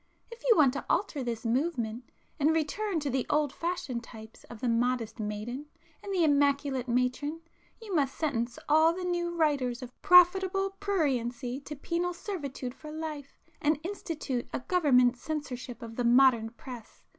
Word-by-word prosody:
If 465 0 -10
you 460 - +7
want 275 -5 +5
to 280 - -5
alter 345 -8 0
this 235 -1 -4
'movement,' 240 -2 -1 0.3
and 305 +2 +3
return 335 +4 -1
to 285 - -2
the 260 -1 -1
old 295 -2 +1
fashioned 310 -9 -3
types 220 -1 -12
of 235 - -11
the 250 - -2
modest 235 -1 0
maiden 215 +7 -4 0.3
and 400 - -6
the 365 -3 +2
immaculate 280 -3 +2
matron, 250 +6 0 0.4
you 440 -4 -7
must 275 -5 +1
sentence 240 -6 -1
all 315 +2 +5
the 365 +1 -5
'new' 345 -1 -1
writers 270 -6 +1
of 250 0 -12
profitable 380 +2 +5
pruriency 255 - -1
to 300 - -6
penal 345 +5 -2
servitude 280 - -5
for 305 +3 -10
life, 305 -3 -6 0.2
and 300 0 +2
institute 325 -9 -4
a - - -3
Government 255 -6 +3
censorship 255 -4 -5
of 225 -1 -9
the 245 - 0
modern 240 -2 +5
press. 235 0 -11
280 Hz, 160 wpm, -29 LUFS, 245-330 Hz, 0.4 s, you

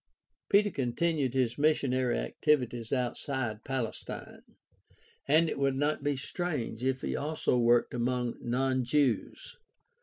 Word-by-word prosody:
Peter 205 0 +4
continued 135 +1 0
his 125 -2 0
missionary 130 -5 +2
activities 125 -6 0
outside 125 -3 -2
Palestine, 130 -4 -5 0.9
and 155 +4 +4
it 155 - -3
would 135 -1 +2
not 145 +2 0
be 145 -1 0
strange 140 -6 -3
if 130 0 0
he - - -2
also 150 -2 0
worked 120 0 +3
among 125 0 -1
non 130 +2 0
Jews. 130 -1 0
130 Hz, 120 wpm, -30 LUFS, 120-145 Hz, 0.9 s, Peter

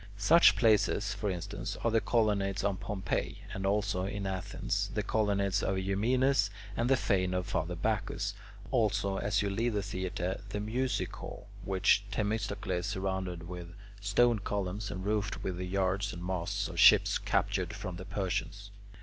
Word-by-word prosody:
Such 160 +12 +6
places, 105 -3 +3
for 105 0 -2
instance, 100 +3 -4
are 115 - +2
the 115 0 +3
colonnades 100 -2 +1
of 100 -2 0
Pompey, 100 -2 -3
and 95 0 -2
also, 100 -2 0
in 100 0 -4
Athens, 95 -2 -2
the - - 0
colonnades 100 -3 +1
of 95 - 0
Eumenes 105 +5 +2 0.3
and 120 +2 0
the 135 - +5
fane 95 -4 +1
of 90 0 -1
Father 90 +1 -2
Bacchus; - - -1 0.4
also, 105 -5 +1
as 105 0 +1
you 100 - -1
leave 115 +4 0
the 100 -1 0
theatre, 95 -1 -3
the 105 - -3
music 125 +5 -1
hall - - -9
which 95 +1 +3
Themistocles 100 -4 -2
surrounded 95 -3 -3
with 85 -1 -8 0.2
stone 110 +3 +3
columns, 100 +1 -3
and 95 +1 -5
roofed 105 0 -1
with 90 -2 -3
the 90 0 -4
yards 95 +2 0
and 85 0 -7
masts 90 -2 -1
of - - -6
ships - - +7
captured - - 0
from 90 -2 -6
the 90 - -8
Persians. 100 +2 -3
100 Hz, 160 wpm, -31 LUFS, 95-105 Hz, 0.4 s, ships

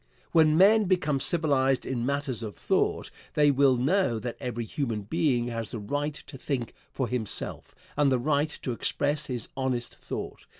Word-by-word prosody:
When 155 -1 +5
men 210 +4 +6
become 175 -7 +1
civilized 135 -4 +1
in 125 -2 -2
matters 140 -4 -2
of 110 -2 -6
thought, - - 0 0.2
they 145 -1 +5
will 135 -2 +4
know 140 - +2
that 120 +1 -4
every 120 -1 -3
human 115 -5 -3
being 125 - +1
has 115 -2 -4
the - - -4
right 145 +8 -2
to 135 - -11
think 125 -6 -3 0.2
for 130 - -2
himself, 120 -4 -4 0.2
and 145 -2 +3
the 130 - +3
right 145 +3 +1
to 130 - -1
express 145 +5 0
his 125 -4 -3
honest 130 -3 -1
thought. - - -7
135 Hz, 170 wpm, -27 LUFS, 120-150 Hz, 0.2 s, men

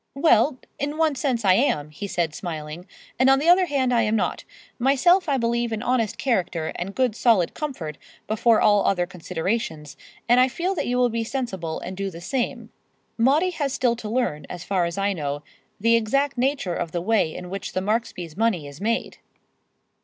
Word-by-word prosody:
"Well, 275 -2 +4 0.2
in 290 +2 -2
one 320 -2 +2
sense, 255 -4 -1
I 185 - +6
am," 155 - +1
he 200 +6 -6
said, 170 -5 -1
smiling; 160 +1 -6 0.3
"and 260 +1 +5
on 270 - +6
the 295 +4 -1
other 360 +1 +6
hand 265 -4 +1
I 235 - +4
am 220 0 +1
not. - - -1 0.3
Myself 295 +8 +3
I 275 - +2
believe 235 -1 0
in 220 +1 -3
honest 240 -4 0
character 180 -10 -1
and 190 +3 -5
good 255 -4 +1
solid 225 -8 +3
comfort 185 - -5 0.3
before 220 +1 +3
all 205 -1 +4
other 180 -2 +2
considerations, 165 -4 -4 0.3
and 245 +1 +5
I 255 - +6
feel 345 +9 -2
that 370 - -2
you 250 +1 0
will 250 -1 +3
be 230 0 -2
sensible 195 -10 -4
and 185 - -6
do 195 +1 -3
the 170 -2 -10
same. 245 +8 -3 0.4
Maudie 290 +10 +3
has 290 -6 -2
still 240 -2 +1
to 220 -3 -6
learn, 215 - -1
as 180 -1 -7
far 185 -2 0
as 170 +2 -4
I 200 0 +1
know, 145 -3 -4 0.4
the 230 +3 +4
exact 275 +6 +1
nature 260 -7 0
of 170 -1 -4
the 175 - 0
way 195 -5 +1
in 180 0 -7
which 195 0 -5
the - - 0
Marksbys' 200 -6 -2
money 205 -7 +1
is 145 +4 -11
made." 230 +3 -2
225 Hz, 200 wpm, -24 LUFS, 180-260 Hz, 0.4 s, I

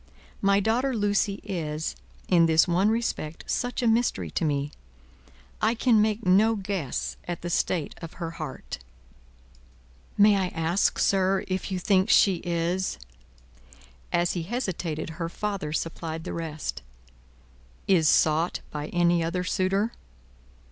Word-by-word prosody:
My 200 0 +4
daughter 240 +6 +1
Lucie 205 -1 0
is, 160 -5 -3 0.3
in 170 -2 +5
this 160 +1 +4
one 180 +4 +3
respect, 220 -9 -2
such 245 +1 -2
a - - +3
mystery 225 - +1
to - - -1
me; 145 -2 0 0.9
I 230 - +2
can 230 -2 +4
make 215 0 0
no 210 +5 +5
guess 190 - -3
at 175 -1 -4
the 175 - -3
state 160 -2 0
of 165 -1 -8
her 165 -2 -5
heart." - - -6 1.4
"May 205 0 +6
I 190 -1 +1
ask, 165 +4 +1
sir, 190 0 +2
if 185 +1 -2
you 185 - -1
think 190 +2 +2
she 200 -4 +5
is 175 +2 -1 0.5
" 60 +1 -26
As 175 0 +2
he 175 - -2
hesitated, 170 -6 -3
her 165 - -1
father 200 -5 -3
supplied 160 0 -3
the - - -5
rest. 160 -2 -4 1.1
"Is 165 -6 +4
sought 160 +2 +2
by 150 0 -4
any 175 -1 +2
other 170 +2 -1
suitor?" 195 +4 0
180 Hz, 140 wpm, -26 LUFS, 165-205 Hz, 1.4 s, May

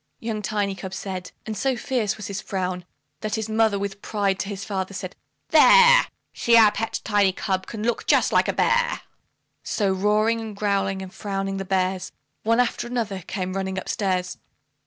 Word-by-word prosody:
Young 225 -2 -3
Tiny 205 -1 -1
cub 190 0 -7
said, 185 -2 -6
and 220 - -4
so 260 +5 0
fierce 230 -4 -1
was 210 - -7
his 200 -1 -4
frown, 185 -3 -3 0.3
That 215 -1 -2
his 220 -1 -3
mother 220 -1 +2
with 200 0 -4
pride 200 -3 -1
to 195 - -3
his 200 -1 -5
father 195 -1 -3
said, 185 0 -6 0.3
"There! - - +7 0.3
See 235 0 +4
our 220 -2 +7
pet 225 +2 -3
Tiny 205 -3 +3
cub 190 0 -2
can 215 -2 -6
look 235 0 -1
just - - +3
like - - +4
a - - 0
bear," 485 0 +1 0.6
So 200 -3 0
roaring, 210 +4 +2
and 220 -2 -7
growling, 195 -2 0
and 185 - -10
frowning, 195 -1 -3
the 195 - -4
bears, 185 0 -1 0.3
One 230 +2 +2
after 240 -1 0
the 245 0 -1
other, 200 -4 -3
came 185 -2 -3
running 190 0 -3
up 190 - -5
stairs. 185 -3 -1
200 Hz, 190 wpm, -24 LUFS, 190-220 Hz, 0.6 s, There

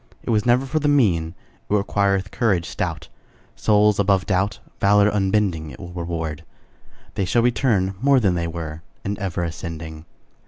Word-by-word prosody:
It - - -2
was 110 +1 +1
never 125 +3 +3
for 155 +4 -1
the 150 - 0
mean; 90 - +2 0.3
It - - -1
requireth 100 -1 +1
courage 100 -8 +1
stout. - - -4 0.5
Souls 105 -1 +3
above 95 -1 +2
doubt, 100 0 0 0.2
Valor 100 +1 +4
unbending, 95 -5 0
It - - -11
will 90 -2 -9
reward, 80 -3 -4 0.7
They 100 - -1
shall 115 +6 +2
return 115 -6 +1
More 140 0 +5
than 100 -6 +2
they 85 -1 -1
were, 80 -2 -6 0.2
And 100 0 -3
ever 90 -4 -2
ascending. 80 -1 -6
100 Hz, 160 wpm, -22 LUFS, 85-105 Hz, 0.7 s, More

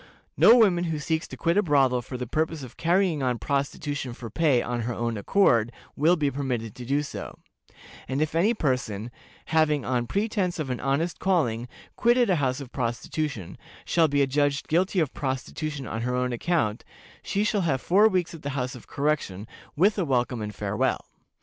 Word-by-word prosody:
No 235 - +7
woman 185 -7 +4
who 160 -2 -2
seeks 160 +2 -2
to - - -9
quit 170 +3 +1
a - - +6
brothel 135 -7 +3
for 125 +2 -7
the 125 - -4
purpose 155 +3 -2
of 125 - -10
carrying 175 -2 +1
on 125 -2 0
prostitution 140 +2 -2
for 115 -2 -9
pay 145 -2 +3
on 120 0 -2
her 120 +1 -3
own 115 0 -2
account 115 - +3 0.3
will 160 +5 +4
be 145 -4 0
permitted 125 -6 -3
to 125 0 -9
do 145 +2 +1
so; 145 - -7 0.7
and 135 +1 -2
if 155 0 0
any 200 +8 +3
person, 125 - -2 0.4
having, 150 -3 +3
on 120 -2 0
pretense 200 - -1
of 150 -5 -3
an 125 - -3
honest 140 +6 -1
calling, 125 -11 +1 0.3
quitted 240 -2 +3
a 180 - +3
house 130 -2 0
of 135 -3 -9
prostitution, 120 - -3 0.3
shall 165 -2 +3
be 145 -1 +2
adjudged 140 +1 0
guilty 185 +4 +1
of 155 -5 0
prostitution 140 +2 -4
on 110 0 -4
her 125 +1 -1
own 125 0 0
account, 120 -5 0 0.4
she 200 - -1
shall 210 -1 +1
have 150 -7 +1
four 200 +10 +4
weeks 185 -5 0
at 165 - -10
the 140 0 -4
House 125 -1 -2
of 125 - -12
Correction, 140 -10 -1 0.3
with 200 +6 +3
a - - +2
welcome 125 -5 0
and 105 -1 -5
farewell. - - -1
140 Hz, 190 wpm, -26 LUFS, 125-165 Hz, 0.7 s, No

